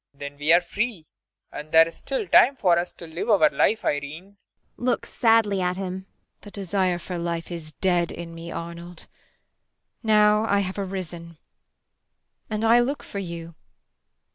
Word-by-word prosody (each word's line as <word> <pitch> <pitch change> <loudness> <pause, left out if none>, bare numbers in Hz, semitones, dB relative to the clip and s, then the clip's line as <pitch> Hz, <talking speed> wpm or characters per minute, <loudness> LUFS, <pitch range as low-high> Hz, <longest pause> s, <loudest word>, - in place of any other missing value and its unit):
Then 140 0 -8
we 150 +2 +2
are 170 +1 +7
free 210 -6 -3 0.5
and 150 +1 -8
there 160 0 +7
is 165 - -9
still 470 -5 -3
time 270 -4 +6
for 180 -8 +3
us 175 - -3
to 170 - -11
live 165 +7 -5
our 190 -8 +5
life, 215 +10 +1
Irene. 145 +4 -2
IRENE. 200 +1 -24 0.4
[Looks 245 0 -2
sadly 225 -4 +3
at 180 0 -1
him.] 190 0 -5 0.3
The 205 - -11
desire 190 -2 -1
for 175 +1 -6
life 170 0 -4
is 160 -3 -7
dead 175 -1 +1
in 170 -1 -8
me, 165 0 -8
Arnold. 170 0 -8 1.0
Now 210 -1 +4
I 200 -2 +2
have 190 +1 -4
arisen. 175 -4 -6 1.1
And 215 +1 -1
I 230 +2 +6
look 270 +4 -1
for 200 - -6
you. 170 -3 -7
180 Hz, 165 wpm, -24 LUFS, 170-205 Hz, 1.1 s, are